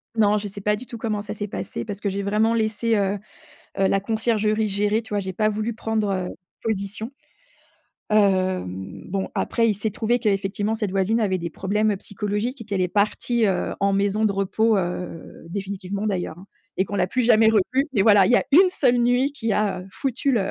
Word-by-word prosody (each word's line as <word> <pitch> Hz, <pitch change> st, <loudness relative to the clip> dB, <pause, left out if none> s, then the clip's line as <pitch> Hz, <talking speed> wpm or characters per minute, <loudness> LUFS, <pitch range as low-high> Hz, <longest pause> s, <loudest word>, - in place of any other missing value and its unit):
Non, 210 Hz, -1 st, +4 dB
je 205 Hz, 0 st, -3 dB
sais 200 Hz, 0 st, -9 dB
pas 210 Hz, +1 st, +2 dB
du 245 Hz, +4 st, -9 dB
tout 235 Hz, -, -8 dB
comment 215 Hz, -3 st, -2 dB
ça 210 Hz, -, -5 dB
s'est 205 Hz, 0 st, -4 dB
passé -, -, -5 dB
parce 205 Hz, -2 st, -6 dB
que 205 Hz, -, -3 dB
j'ai 200 Hz, +1 st, -2 dB
vraiment 215 Hz, +3 st, +2 dB
laissé, 225 Hz, 0 st, +1 dB
heu 200 Hz, 0 st, 0 dB, 0.6 s
heu, 195 Hz, -, +3 dB
la 195 Hz, -, +2 dB
conciergerie 220 Hz, 0 st, 0 dB
gérer. 210 Hz, +3 st, +1 dB
Tu -, -, -16 dB
vois 205 Hz, -, +1 dB
j'ai 190 Hz, -1 st, -3 dB
pas 215 Hz, +4 st, +1 dB
voulu 215 Hz, +2 st, -2 dB
prendre, 220 Hz, -2 st, -1 dB
heu, 185 Hz, -1 st, -2 dB, 0.3 s
position. 215 Hz, +1 st, -3 dB, 1.0 s
Hem, 185 Hz, -, +1 dB
bon 190 Hz, +1 st, -2 dB
après 230 Hz, -1 st, +1 dB
il 210 Hz, -, +2 dB
s'est 210 Hz, +1 st, -3 dB
trouvé 235 Hz, +3 st, +1 dB
qu'effectivement 205 Hz, 0 st, 0 dB
cette 210 Hz, -3 st, -2 dB
voisine 195 Hz, +4 st, +1 dB
avait 190 Hz, -3 st, +1 dB
des 170 Hz, 0 st, -4 dB
problèmes 205 Hz, +4 st, 0 dB
psychologiques 210 Hz, +6 st, -3 dB
et -, -, -7 dB
qu'elle 200 Hz, -3 st, -2 dB
est 180 Hz, -, +1 dB
partie, 215 Hz, +3 st, +1 dB
heu, 190 Hz, -2 st, 0 dB
en 200 Hz, 0 st, +2 dB
maison 200 Hz, +2 st, +1 dB
de 205 Hz, -, +3 dB
repos, 210 Hz, +3 st, +1 dB
heu, 175 Hz, -3 st, -4 dB
définitivement 200 Hz, +1 st, -4 dB
d'ailleurs, 175 Hz, -4 st, -3 dB
hein 195 Hz, -, -14 dB, 0.3 s
et 190 Hz, -, +2 dB
qu'on 205 Hz, -, -5 dB
l'a 185 Hz, -, +2 dB
plus 250 Hz, +6 st, 0 dB
jamais 220 Hz, -1 st, +5 dB
revu. 255 Hz, +7 st, +2 dB
Mais 200 Hz, -, +3 dB
voilà, 205 Hz, -3 st, +6 dB
il -, -, +2 dB
y -, -, +7 dB
a -, -, +2 dB
1 370 Hz, +5 st, +7 dB
seule 255 Hz, -9 st, +2 dB
nuit 245 Hz, +4 st, +2 dB
qui 225 Hz, -6 st, -2 dB
a 195 Hz, -3 st, 0 dB
foutu 270 Hz, +1 st, -1 dB
le 195 Hz, -5 st, +1 dB
210 Hz, 210 wpm, -23 LUFS, 195-225 Hz, 1.0 s, y